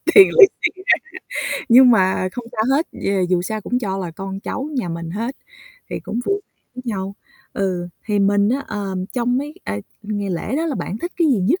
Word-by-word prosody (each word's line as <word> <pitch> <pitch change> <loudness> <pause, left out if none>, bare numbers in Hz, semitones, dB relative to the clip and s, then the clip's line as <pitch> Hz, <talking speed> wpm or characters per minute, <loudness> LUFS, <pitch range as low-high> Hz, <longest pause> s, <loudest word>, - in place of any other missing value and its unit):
tiền 390 -2 +10
lì 415 -5 +9 0.2
xì - - +4 0.8
ra, - - -1
nhưng 250 +1 +8
mà 190 -3 +3
không 245 - -6
sao 220 - 0
hết, 315 - +1
d - - -4 0.2
dù 175 -1 +3
sao 215 +3 -3
cũng 245 +4 -1
cho 195 -5 -2
là 180 -3 -4
con 195 +3 -6
cháu 270 +7 -4
nhà 225 -9 -1
mình 165 0 -5
hết 230 +8 -3 0.5
thì - - -3
cũng 235 - -3
vui 400 0 0
vẻ - - -50 0.2
với 255 - -7
nhau. 195 -3 -3 0.4
Ừ, 180 -3 -1 0.2
thì 210 -2 0
mình 200 +1 +3
á, 265 +4 0
ờ, 200 -2 -4 0.2
trong 245 0 +1
mấy, 295 +2 -5
à, 100 +1 -2 0.2
ngày 205 -1 -3
lễ 180 +10 -2
đó 325 - 0
là 300 - -1
bạn 205 - -4
thích 345 +8 -4
cái 335 -3 +3
gì 255 - +3
nhất 285 - +2
210 Hz, 220 wpm, -21 LUFS, 190-260 Hz, 0.8 s, tiền